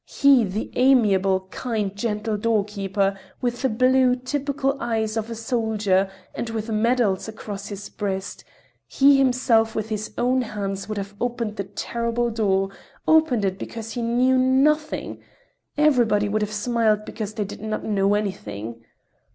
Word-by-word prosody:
He, 275 Hz, -4 st, +5 dB
the 200 Hz, +3 st, -4 dB
amiable, 200 Hz, -8 st, +3 dB
kind, 215 Hz, -6 st, -2 dB
gentle 210 Hz, 0 st, -2 dB
doorkeeper, 200 Hz, -2 st, 0 dB, 0.2 s
with 245 Hz, -1 st, -2 dB
the 265 Hz, -, +2 dB
blue, 255 Hz, +2 st, +3 dB
typical 275 Hz, +1 st, -1 dB
eyes 220 Hz, -2 st, -1 dB
of 225 Hz, 0 st, -2 dB
a 230 Hz, -, -4 dB
soldier, 220 Hz, -4 st, 0 dB, 0.2 s
and 235 Hz, -, -4 dB
with 225 Hz, 0 st, -4 dB
medals 215 Hz, -3 st, +1 dB
across 205 Hz, -2 st, -7 dB
his 205 Hz, 0 st, -7 dB
breast—he 205 Hz, +7 st, -1 dB
himself 245 Hz, -4 st, +3 dB
with 220 Hz, 0 st, -2 dB
his 215 Hz, -1 st, -3 dB
own 255 Hz, +2 st, +2 dB
hands 200 Hz, -3 st, -4 dB
would 215 Hz, -, -3 dB
have 200 Hz, 0 st, -5 dB
opened 235 Hz, -3 st, -2 dB
the 200 Hz, -, -3 dB
terrible 235 Hz, +4 st, -2 dB
door, 195 Hz, -3 st, +1 dB, 0.4 s
opened 310 Hz, -10 st, +4 dB
it 190 Hz, 0 st, -2 dB
because 225 Hz, -1 st, -6 dB
he 240 Hz, -, -3 dB
knew 250 Hz, +3 st, +3 dB
nothing. 295 Hz, +4 st, +1 dB, 0.6 s
Everybody 240 Hz, -9 st, +3 dB
would 215 Hz, +1 st, 0 dB
have 210 Hz, 0 st, -2 dB
smiled 215 Hz, -1 st, +1 dB
because 215 Hz, -2 st, -6 dB
they 210 Hz, -3 st, -1 dB
did 200 Hz, -, -9 dB
not 215 Hz, 0 st, -3 dB
know 200 Hz, -1 st, +2 dB
anything. 115 Hz, -, -4 dB
220 Hz, 145 wpm, -23 LUFS, 205-245 Hz, 0.6 s, He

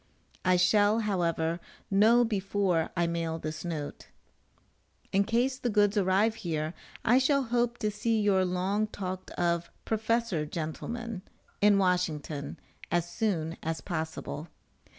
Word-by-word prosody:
I 185 Hz, -, +4 dB
shall, 205 Hz, +4 st, +4 dB
however, 170 Hz, -5 st, 0 dB, 0.3 s
know 225 Hz, +5 st, +5 dB
before 195 Hz, -5 st, 0 dB
I 170 Hz, -, +3 dB
mail 165 Hz, -1 st, -1 dB
this 155 Hz, -1 st, -5 dB
note. 160 Hz, -4 st, -5 dB, 1.0 s
In 195 Hz, +1 st, +3 dB
case 250 Hz, +4 st, +1 dB
the 245 Hz, -, -1 dB
goods 205 Hz, -1 st, +3 dB
arrive 200 Hz, +2 st, +3 dB
here 155 Hz, -2 st, -2 dB, 0.3 s
I 245 Hz, +3 st, +6 dB
shall 275 Hz, +1 st, +3 dB
hope 240 Hz, 0 st, 0 dB
to 215 Hz, -3 st, -1 dB
see 225 Hz, +2 st, 0 dB
your 200 Hz, -3 st, +3 dB
long 185 Hz, +4 st, 0 dB
talked 185 Hz, -3 st, -5 dB
of 170 Hz, -1 st, 0 dB, 0.2 s
"Professional 220 Hz, -6 st, 0 dB
gentleman" 190 Hz, +8 st, -4 dB, 0.4 s
in 205 Hz, 0 st, +6 dB
Washington, 160 Hz, -6 st, -1 dB, 0.3 s
as 175 Hz, 0 st, +1 dB
soon 175 Hz, -4 st, -1 dB
as 160 Hz, 0 st, -2 dB
possible. 160 Hz, -2 st, -4 dB
190 Hz, 130 wpm, -29 LUFS, 170-220 Hz, 1.0 s, I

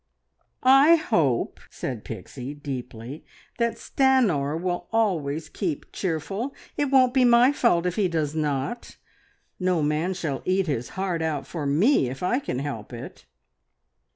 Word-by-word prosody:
"I 270 Hz, +5 st, +7 dB
hope," 165 Hz, -, 0 dB
said 120 Hz, -5 st, -5 dB
Pixie 125 Hz, +6 st, -7 dB
deeply, 130 Hz, -1 st, -7 dB, 0.4 s
"that 235 Hz, 0 st, +1 dB
Stanor 205 Hz, -, +2 dB
will 175 Hz, 0 st, -3 dB
always 165 Hz, -9 st, 0 dB
keep 165 Hz, -4 st, -4 dB
cheerful. 195 Hz, -, -3 dB, 0.2 s
It 290 Hz, -, +1 dB
won't 260 Hz, -2 st, +4 dB
be 260 Hz, -1 st, +4 dB
my 245 Hz, +2 st, +6 dB
fault 230 Hz, -11 st, +2 dB
if 180 Hz, +2 st, -1 dB
he 205 Hz, -3 st, +3 dB
does 155 Hz, -4 st, -1 dB
not. 150 Hz, -, -3 dB, 0.6 s
No 180 Hz, -4 st, +1 dB
man 155 Hz, +5 st, 0 dB
shall 155 Hz, -7 st, -3 dB
`eat 190 Hz, +1 st, +1 dB
his 130 Hz, -7 st, -2 dB
heart 185 Hz, -3 st, -1 dB
out' 155 Hz, -3 st, -2 dB
for 155 Hz, -5 st, -4 dB
me 155 Hz, -, +3 dB
if 130 Hz, +6 st, -7 dB
I 240 Hz, +8 st, +2 dB
can 125 Hz, -, -4 dB
help 130 Hz, -6 st, -5 dB
it!" 120 Hz, -1 st, -9 dB
170 Hz, 145 wpm, -25 LUFS, 140-225 Hz, 0.6 s, I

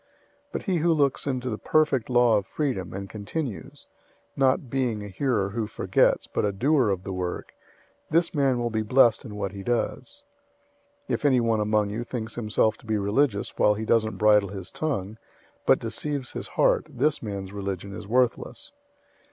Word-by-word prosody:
001:025 -, -, -38 dB, 0.5 s
But -, -, -3 dB
he 185 Hz, -3 st, 0 dB
who 165 Hz, +1 st, +3 dB
looks 145 Hz, -2 st, +1 dB
into 130 Hz, -2 st, -2 dB
the 110 Hz, -, -4 dB
perfect 150 Hz, -7 st, +2 dB
law 120 Hz, -2 st, +4 dB
of 100 Hz, -2 st, -3 dB
freedom, 125 Hz, -, -2 dB
and 100 Hz, +1 st, -6 dB
continues, 110 Hz, +4 st, -6 dB, 0.5 s
not 135 Hz, 0 st, +2 dB
being 120 Hz, -4 st, -1 dB
a -, -, -6 dB
hearer 100 Hz, 0 st, 0 dB
who 110 Hz, 0 st, -2 dB
forgets, -, -, +2 dB
but -, -, -2 dB
a 105 Hz, -, +1 dB
doer 130 Hz, +4 st, +2 dB
of 95 Hz, -2 st, -1 dB
the 95 Hz, -, -5 dB
work, 90 Hz, -1 st, -4 dB, 0.6 s
this 165 Hz, +2 st, +2 dB
man 135 Hz, -4 st, +2 dB
will 120 Hz, -1 st, -1 dB
be 110 Hz, 0 st, 0 dB
blessed 115 Hz, +1 st, +4 dB
in 105 Hz, -4 st, -8 dB
what 100 Hz, -2 st, -3 dB
he 100 Hz, 0 st, -8 dB
does. 205 Hz, -, -2 dB, 0.8 s
001:026 -, -, -2 dB
If -, -, -2 dB
anyone 120 Hz, -5 st, +3 dB
among 105 Hz, -1 st, +1 dB
you 115 Hz, +3 st, -3 dB
thinks 115 Hz, -3 st, -5 dB
himself 110 Hz, -1 st, +1 dB
to 120 Hz, -, -18 dB
be 110 Hz, -1 st, +1 dB
religious 100 Hz, +2 st, 0 dB
while 105 Hz, -, +4 dB
he 110 Hz, +1 st, -4 dB
doesn't 110 Hz, -1 st, +1 dB
bridle 105 Hz, -2 st, +4 dB
his 95 Hz, -1 st, -7 dB
tongue, 110 Hz, -9 st, -3 dB, 0.5 s
but -, -, +6 dB
deceives 145 Hz, -4 st, -3 dB
his -, -, -5 dB
heart, -, -, +2 dB
this 145 Hz, +4 st, 0 dB
man's 100 Hz, -3 st, -5 dB
religion 100 Hz, -1 st, -4 dB
is 100 Hz, -, -8 dB
worthless. 130 Hz, -, 0 dB
115 Hz, 185 wpm, -26 LUFS, 100-135 Hz, 0.8 s, but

